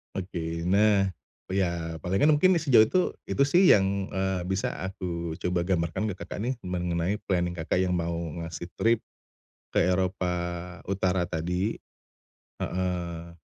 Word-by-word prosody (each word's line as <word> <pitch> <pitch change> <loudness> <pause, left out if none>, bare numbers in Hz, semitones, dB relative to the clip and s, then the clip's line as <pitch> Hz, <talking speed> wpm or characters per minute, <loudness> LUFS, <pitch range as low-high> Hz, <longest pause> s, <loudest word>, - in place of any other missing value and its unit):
Oke. 85 -3 -3
Nah, 100 +1 +4 0.4
iya 85 -4 -1
palingan 100 +12 +4
mungkin 185 +5 +5
sejauh 135 -8 +6
itu, 115 +12 +2 0.3
itu 140 - +2
sih 175 +6 +5
yang, 95 -1 +2
eee, 95 -1 -1
bisa 95 +2 -1 0.2
aku 85 -3 -4
coba 90 -1 0
gambarkan 85 +1 0
ke - - -6
Kakak - - -6
nih 125 +3 0
mengenai 90 +1 -1
planning 90 -2 0
Kakak 85 +1 -1
yang 90 -1 +1
mau 85 -1 -1 0.3
ngasih 85 +1 -6
trip 115 0 +3 0.7
ke - - +2
Eropa 90 0 +1 0.6
Utara 95 -2 +1
tadi, 90 +5 -2 0.8
heeh. 85 -2 -3
90 Hz, 135 wpm, -27 LUFS, 85-100 Hz, 0.8 s, sejauh